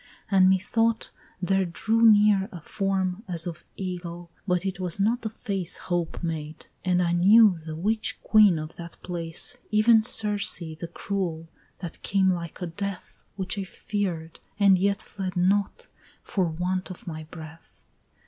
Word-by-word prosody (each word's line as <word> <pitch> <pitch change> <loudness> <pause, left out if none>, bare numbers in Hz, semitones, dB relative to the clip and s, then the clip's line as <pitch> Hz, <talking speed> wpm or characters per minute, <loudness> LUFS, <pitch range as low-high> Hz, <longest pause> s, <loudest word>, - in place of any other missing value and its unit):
and 190 -1 +6
methought 225 +4 +1 0.3
there 195 +1 +2
drew 220 +6 0
near 210 -3 +5
A 175 - -8
form 190 +2 -2
as 170 -3 -2
of 170 -2 -6
Ægle, 175 -2 -6 0.2
but 180 0 +1
it 190 -1 -3
was 180 0 -2
not 225 +5 +2
the 220 - -3
face 195 -5 -2
Hope 175 -1 -3
made, 155 -2 -5 0.2
and 180 -1 +2
I 170 - +1
knew 200 +3 +6
the 160 0 -7
witch 215 +6 -1
Queen 210 -5 +5
of 155 +1 -7
that 170 0 -9
place, 170 +6 -1
Even 220 +1 +5
Circe 210 -3 +1
the 165 -1 -7
Cruel, 170 -5 -3 0.3
that 175 -3 -7
came 190 -1 +2
like 170 0 -6
a - - 0
Death, 195 +3 -6
Which 190 +1 -3
I - - -2
fear'd, 180 -4 -4 0.2
and 195 -2 +5
yet 200 +1 +1
fled 190 -3 -5
not, 200 - +1 0.4
for 190 -3 0
want 180 +3 -2
of 185 - -9
my 155 -2 -6
breath. 160 0 -13
185 Hz, 160 wpm, -26 LUFS, 170-200 Hz, 0.4 s, and